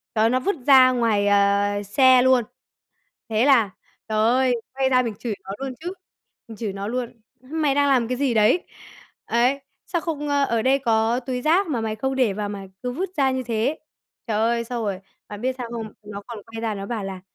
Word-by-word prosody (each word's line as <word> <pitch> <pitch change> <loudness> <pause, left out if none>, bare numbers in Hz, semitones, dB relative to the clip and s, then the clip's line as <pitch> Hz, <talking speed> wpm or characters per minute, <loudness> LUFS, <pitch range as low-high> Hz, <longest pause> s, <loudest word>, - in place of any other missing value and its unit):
đó, 220 +1 +3
nó 255 +2 +2
vứt 400 +8 -1
ra 260 -2 +8
ngoài, 225 -5 +1
ờ, 205 0 +2
xe 255 +4 +5
luôn. 260 -1 +4 0.9
Thế 220 +1 +2
là 235 -8 +4 0.4
trời 215 -1 -1
ơi, 250 +3 +3 0.2
quay 265 0 +1
ra 255 -1 +3
mình 230 -4 -3
chửi 230 -4 -3
nó 190 - -9
luôn 270 -1 -5
chứ, 350 +2 -5 0.6
mình 225 - -9
chửi 215 -2 -4
nó 200 +1 -5
luôn: 240 -1 -4 0.2
"Mày 290 +2 -1
đang 285 0 +3
làm 250 -4 +2
cái 250 - -1
gì 265 -2 0
đấy? 220 +10 +3 0.6
Ấy, 250 +4 +2 0.3
sao 345 - -1
không, 295 -3 -4
ơ 285 -1 +2
ở 230 -4 0
đây 265 +3 +3
có 230 -1 +1
túi 250 0 -4
rác 345 +7 +3
mà 275 -8 -2
mày 220 -1 -3
không 265 +4 -2
để 255 -6 +2
vào 205 +1 -3
mà 200 -1 -6 0.2
cứ 250 - -2
vứt 360 +9 -3
ra 270 -2 +3
như 260 0 -2
thế?" 235 +4 -1 0.5
Trời 220 -3 -1
ơi, 235 +1 +1
xong 235 -1 -4
rồi, 195 -3 -3 0.3
bạn 205 -1 -8
biết 255 +2 -1
sao 245 -2 -5
không, 225 -3 -5
nó 205 -1 -8
còn 235 -3 -7
quay 225 +2 -9
ra 225 -2 -2
nó 195 0 -6
bảo 220 -2 -4
là 190 -1 -6
240 Hz, 220 wpm, -23 LUFS, 215-265 Hz, 0.9 s, ra